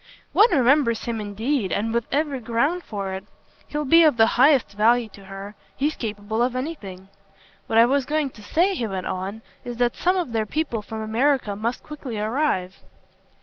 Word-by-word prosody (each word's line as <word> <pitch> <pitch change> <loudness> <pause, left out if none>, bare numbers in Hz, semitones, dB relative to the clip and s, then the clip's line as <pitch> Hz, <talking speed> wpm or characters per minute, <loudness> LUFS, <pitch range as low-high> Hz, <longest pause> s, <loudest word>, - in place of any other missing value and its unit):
"One 440 +3 +6
remembers 260 - +3
him 230 -2 -2
indeed, 210 - -2
and 225 +2 -1
with 235 -1 -1
every 285 -2 0
ground 250 +10 0
for 195 -2 -4
it. 190 0 -5 0.4
He'll 300 0 -3
be 330 +5 +6
of 305 -6 +4
the 225 - +7
highest 270 +1 +4
value 225 +3 +2
to 200 -1 -15
her 195 +1 -8 0.2
he's 295 +3 0
capable 215 0 -3
of 245 +1 +1
anything. 205 - -6 0.6
What 225 - 0
I 230 - +8
was 270 +1 +1
going 300 -2 0
to 215 - -15
say," 345 - +1
he 240 -11 -2
went 190 -2 -4
on, 195 +4 -4 0.2
"is 240 -1 -6
that 240 -1 +1
some 365 +2 +1
of 345 -9 -2
their 220 -2 -1
people 285 -5 -2
from 220 +1 -7
America 230 -1 +1
must 230 +4 -3
quickly 280 -7 -7
arrive." 210 -4 -1
235 Hz, 190 wpm, -23 LUFS, 210-285 Hz, 0.6 s, I